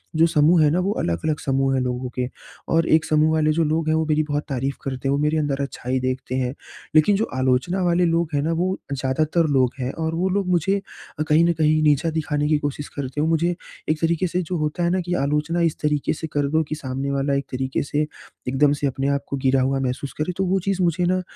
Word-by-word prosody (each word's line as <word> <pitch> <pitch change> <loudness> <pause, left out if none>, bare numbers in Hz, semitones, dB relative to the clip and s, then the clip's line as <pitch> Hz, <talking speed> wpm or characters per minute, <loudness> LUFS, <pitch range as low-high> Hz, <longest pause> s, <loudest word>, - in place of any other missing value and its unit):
जो 160 +1 +5
समूह 160 +1 +4
है 150 - +5
ना, 175 - +2
वो 195 +3 0
अलग-अलग 85 - -1
समूह 135 0 +1
है 130 - +2
लोगों 125 0 -3
के। 125 -1 -1 0.5
और 165 0 +3
एक 160 0 +4
समूह 155 0 +3
वाले 155 -1 +2
जो 165 - +2
लोग 155 +1 0
हैं 155 - +3
वो 160 0 +1
मेरी 155 0 +2
बहुत 145 0 -2
तारीफ़ 135 +1 -2
करते 135 0 -3
हैं 135 - +2
वो 140 - +1
मेरे 150 +1 +1
अंदर 145 -2 -1
अच्छाई 130 -2 -2
देखते 130 0 -3
हैं। 130 0 -1 0.4
लेकिन 155 +7 +5
जो 215 +3 +1
आलोचना 130 +9 +1
वाले 175 0 +3
लोग 165 -1 +1
हैं 145 - +1
ना, 160 - 0
वो 185 +3 0 0.2
ज़्यादातर 155 +5 +1
लोग 130 -2 +3
हैं 125 +1 -2
और 160 +1 -1
वो 185 +3 0
लोग 195 0 0
मुझे 195 +3 +1 0.5
कहीं 155 +2 +5
न 170 - +3
कहीं 155 0 +2
नीचा 150 +2 +3
दिखाने 150 -2 -1
की 155 - +4
कोशिश 145 0 -4
करते 140 0 -4
हैं। 155 - +1
मुझे 170 +2 +1 0.3
एक 155 0 +1
तरीके 170 +2 +1
से 180 +2 -1
जो 175 +1 -3
होता 155 +2 -1
है 170 - +2
ना, 185 +1 +1
कि 175 0 -3
आलोचना 150 +4 0
इस 165 -2 +1
तरीके 150 -1 +1
से 160 +1 -5
कर 145 -1 +1
दो 160 +1 +2
कि 155 - -2
सामने 135 -1 -4
वाला 140 0 0
एक 140 - -1
तरीके 130 +1 -2
से 150 +1 -1 0.4
एकदम 140 +3 +3
से 140 - +2
अपने 135 +1 -2
आप 140 - -3
को 140 - -3
गिरा 130 0 +2
हुआ 135 +1 +1
महसूस 130 +1 -3
करे 180 +4 -1
तो 190 - +1
वो 190 +1 +1
चीज़ 190 0 -1
मुझे 175 +1 +1
ना 185 +1 +1
150 Hz, 245 wpm, -22 LUFS, 135-165 Hz, 0.5 s, जो